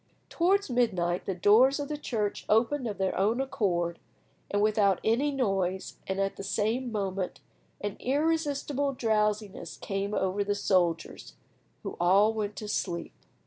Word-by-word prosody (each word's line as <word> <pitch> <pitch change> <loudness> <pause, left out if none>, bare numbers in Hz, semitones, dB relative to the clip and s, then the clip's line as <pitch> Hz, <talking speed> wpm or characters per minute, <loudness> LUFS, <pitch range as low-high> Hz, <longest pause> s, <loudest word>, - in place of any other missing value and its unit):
Towards 390 +4 +2
midnight 185 -9 0
the 195 - -1
doors 230 - +5
of 285 - -3
the 300 - -3
church 220 -8 -2
opened 245 +5 +2
of 210 - -4
their 190 -1 0
own 215 +6 +1
accord 175 -10 -1 0.5
and 205 - 0
without 210 -2 +3
any 240 +7 +2
noise, 195 -8 -1
and, 190 0 -2
at 195 0 -1
the - - -6
same 220 +5 -1
moment, 195 -3 -3 0.4
an 205 -1 -4
irresistible 285 -1 0
drowsiness 210 -4 -1
came 200 +1 -3
over 190 +2 0
the 205 0 -1
soldiers, 175 -5 0 0.5
who - - -6
all 195 +5 +4
went 210 -2 -3
to 215 - -6
sleep. 175 -4 -3
210 Hz, 145 wpm, -29 LUFS, 195-250 Hz, 0.5 s, doors